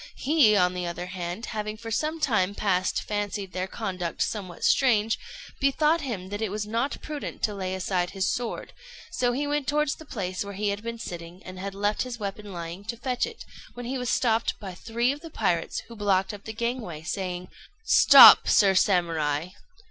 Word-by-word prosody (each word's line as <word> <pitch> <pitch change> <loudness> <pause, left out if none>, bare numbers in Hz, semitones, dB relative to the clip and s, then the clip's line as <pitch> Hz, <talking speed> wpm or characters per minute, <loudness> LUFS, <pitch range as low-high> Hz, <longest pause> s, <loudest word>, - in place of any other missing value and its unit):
He, 275 -7 +4
on 180 -2 +3
the 180 -1 -3
other 175 +1 -4
hand, 180 +3 -5
having 215 -1 -4
for 225 0 -8
some 310 +7 -1
time 205 -9 +1
past 185 -3 0
fancied 205 -2 -3
their 185 0 -2
conduct 185 -5 -3
somewhat 185 -5 -5
strange, 225 -4 +3 0.4
bethought 300 +4 +2
him 210 -10 -5
that 205 +2 -5
it 220 - -1
was 210 +1 -3
not 230 +6 -2
prudent 300 -2 -6
to 210 - +1
lay 190 -2 -3
aside 180 -1 -1
his 190 -2 -2
sword, 240 -1 -5 0.4
so 245 -1 +1
he 275 +4 -1
went 290 -1 -1
towards 300 0 +1
the 315 - -12
place 185 -9 -4
where 200 -1 -8
he 205 +1 -1
had 200 +1 -3
been 230 +1 -5
sitting, 175 -3 -8
and 185 0 -9
had 195 +1 -5
left 205 +1 0
his 250 -2 -4
weapon 205 0 -5
lying, 170 +1 -7
to 235 +2 -4
fetch 250 - -1
it, 460 -1 -10 0.3
when 245 0 -7
he 260 +2 -3
was 250 -1 -2
stopped 230 -2 +1
by 190 -3 -7
three 235 +6 -1
of 290 +1 -6
the 330 - -9
pirates, 180 - -1
who 230 - -13
blocked 195 -2 +1
up 205 -1 -10
the 220 - -5
gangway, 225 -9 -4
saying 180 0 -4 0.4
"Stop, - - +9
Sir 200 -3 +5
Samurai! 165 -4 +1
205 Hz, 195 wpm, -26 LUFS, 185-240 Hz, 0.4 s, Stop